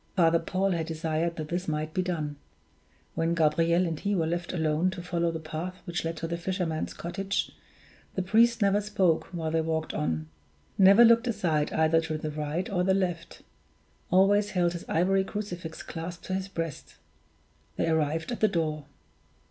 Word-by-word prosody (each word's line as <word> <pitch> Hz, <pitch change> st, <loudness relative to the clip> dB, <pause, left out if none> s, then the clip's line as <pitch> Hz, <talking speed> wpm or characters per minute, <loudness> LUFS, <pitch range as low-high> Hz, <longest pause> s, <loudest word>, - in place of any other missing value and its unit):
Father 170 Hz, -2 st, +4 dB
Paul 190 Hz, +3 st, 0 dB
had 165 Hz, -2 st, -1 dB
desired 160 Hz, +1 st, -1 dB
that 155 Hz, -2 st, -5 dB
this 180 Hz, +2 st, -2 dB
might 155 Hz, 0 st, -2 dB
be 185 Hz, -, +1 dB
done. 155 Hz, -5 st, -3 dB, 0.8 s
When 165 Hz, +1 st, 0 dB
Gabriel 165 Hz, +2 st, +3 dB
and 165 Hz, -3 st, -3 dB
he 205 Hz, 0 st, 0 dB
were 165 Hz, -3 st, +1 dB
left 170 Hz, +1 st, -2 dB
alone 160 Hz, +1 st, +1 dB
to 185 Hz, -1 st, -6 dB
follow 170 Hz, -1 st, 0 dB
the 165 Hz, -1 st, -3 dB
path 160 Hz, +3 st, -5 dB
which 175 Hz, -2 st, -3 dB
led 165 Hz, 0 st, -3 dB
to 165 Hz, -, -3 dB
the 170 Hz, +1 st, -3 dB
fisherman's 175 Hz, -3 st, -2 dB
cottage, 195 Hz, +3 st, -2 dB, 0.6 s
the 185 Hz, -, 0 dB
priest 230 Hz, +3 st, +4 dB
never 200 Hz, +1 st, +3 dB
spoke 195 Hz, -6 st, +1 dB
while 165 Hz, -3 st, -4 dB
they 160 Hz, 0 st, +2 dB
walked 160 Hz, 0 st, -2 dB
on 80 Hz, 0 st, -2 dB, 0.5 s
never 195 Hz, +4 st, +7 dB
looked 235 Hz, +1 st, +5 dB
aside 170 Hz, -10 st, 0 dB
either 160 Hz, +1 st, +3 dB
to 160 Hz, -1 st, -3 dB
the 155 Hz, 0 st, -4 dB
right 150 Hz, +4 st, -3 dB
or 180 Hz, -2 st, 0 dB
the 190 Hz, +1 st, +3 dB
left 175 Hz, -3 st, -3 dB, 0.7 s
always 200 Hz, +3 st, +4 dB
held 175 Hz, -2 st, +1 dB
his 175 Hz, -, -8 dB
ivory 190 Hz, +4 st, +2 dB
crucifix 180 Hz, -5 st, -6 dB
clasped 170 Hz, +1 st, -7 dB
to 185 Hz, -, -3 dB
his 190 Hz, 0 st, -2 dB
breast. 165 Hz, -6 st, -5 dB, 0.8 s
They -, -, 0 dB
arrived 160 Hz, +3 st, 0 dB
at 240 Hz, -, -3 dB
the 215 Hz, -, +4 dB
door. 155 Hz, -5 st, -1 dB
170 Hz, 180 wpm, -28 LUFS, 160-190 Hz, 0.8 s, never